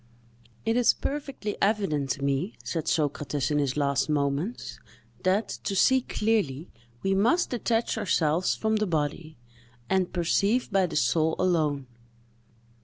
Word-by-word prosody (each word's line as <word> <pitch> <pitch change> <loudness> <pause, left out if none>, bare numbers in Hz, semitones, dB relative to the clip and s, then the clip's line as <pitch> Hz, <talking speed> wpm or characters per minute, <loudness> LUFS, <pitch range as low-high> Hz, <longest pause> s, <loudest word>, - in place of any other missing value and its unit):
"It 225 +1 +1
is 245 - +4
perfectly 275 -7 -4
evident 195 -10 +1
to 140 - -8
me," 140 - -1
said 165 -3 -3
Socrates, 145 -3 0
in 150 - +2
his 140 -1 -1
last 140 -1 +1
moments, 145 - -2 0.4
"that, 195 +4 +1 0.2
to 195 - -1
see 260 +7 +4
clearly, 200 - -1 0.3
we 195 - +2
must 235 - +2
detach 230 -1 0
ourselves 165 -1 +1
from 220 0 0
the 215 -1 0
body, 155 -1 -2 0.5
and 190 -2 +1
perceive 200 +8 +1
by 195 -2 +3
the - - -7
soul 160 +1 +2
alone. 155 -7 +1
175 Hz, 135 wpm, -27 LUFS, 150-215 Hz, 0.5 s, is